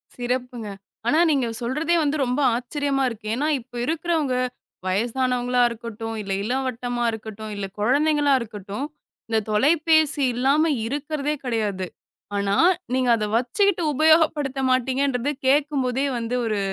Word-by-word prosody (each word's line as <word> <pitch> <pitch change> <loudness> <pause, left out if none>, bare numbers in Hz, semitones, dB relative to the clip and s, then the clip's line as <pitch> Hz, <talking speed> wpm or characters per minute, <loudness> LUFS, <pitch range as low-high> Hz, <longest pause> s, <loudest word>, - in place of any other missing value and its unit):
சிறப்புங்க. 245 -2 -3 0.4
ஆனா, 305 +6 +4
நீங்கச் 240 -6 0
சொல்றதே 300 +8 0
வந்து 295 +1 0
ரொம்ப 250 +3 -1 0.2
ஆச்சரியமா 275 +3 -1
இருக்கு. 220 -2 -9
ஏன்னா, 290 +4 0
இப்ப 245 +1 -18
இருக்கறவங்க 320 -4 0 0.5
வயசானவங்களா 245 +4 +1
இருக்கட்டும், 225 -1 -6
இல்ல 195 -1 -6
இளவட்டமா 245 0 -2
இருக்கட்டும், 220 -1 -7
இல்ல 200 -1 -3
குழந்தைங்களா 290 +5 +3
இருக்கட்டும், 210 +2 -6 0.4
இந்தத் 220 -2 0
தொலைபேசி 305 +4 +3
இல்லாம 275 +6 +2 0.2
இருக்கறதே 295 +2 -2
கிடையாது. 210 -6 -1 0.5
ஆனா, 200 0 +1 0.4
நீங்க 255 -1 +1
அதை 210 -1 -1
வச்சுக்கிட்டு 360 - +1
உபயோகப்படுத்த 310 -2 +3
மாட்டீங்கன்றத 260 +1 +1 0.2
கேக்கும்போதே 275 -2 +2
வந்து 235 +1 -2
ஒரு 215 -2 0
255 Hz, 120 wpm, -23 LUFS, 230-290 Hz, 0.5 s, ஆனா